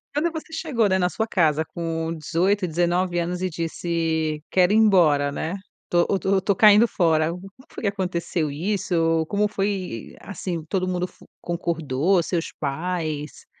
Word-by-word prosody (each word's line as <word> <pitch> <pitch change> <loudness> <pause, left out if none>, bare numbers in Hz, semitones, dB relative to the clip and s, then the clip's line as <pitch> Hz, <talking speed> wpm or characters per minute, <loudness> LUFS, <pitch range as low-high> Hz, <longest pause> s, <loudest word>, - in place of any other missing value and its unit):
Quando 325 +3 +1
você 320 0 -8
chegou, 275 -10 0
né, 190 0 +2
na 180 0 +2
sua 220 - -2
casa 160 -5 +2
com 165 -1 -3
18, 180 +5 0
19 175 +2 0
anos 175 +1 -2
e 185 - 0
disse 160 -2 -2
quero 185 +1 +4
ir - - +3
embora, 170 -10 +4
né. 160 +6 -3 0.3
Tô 175 0 +3
tô 190 0 +2
tô 195 +1 0
caindo 215 +3 +7
fora. 160 -4 +2
Como 180 +3 -8 0.2
foi - - -8
que - - +1
aconteceu 175 -5 -2
isso? 165 -1 0
Como 210 0 +1
foi, 195 - -3
assim, 180 -5 -5
todo 185 -2 0
mundo 180 0 -1
fo - - -20 0.2
concordou, 170 0 0
seus 170 0 -2
pais 155 0 -3
175 Hz, 160 wpm, -23 LUFS, 160-195 Hz, 0.3 s, caindo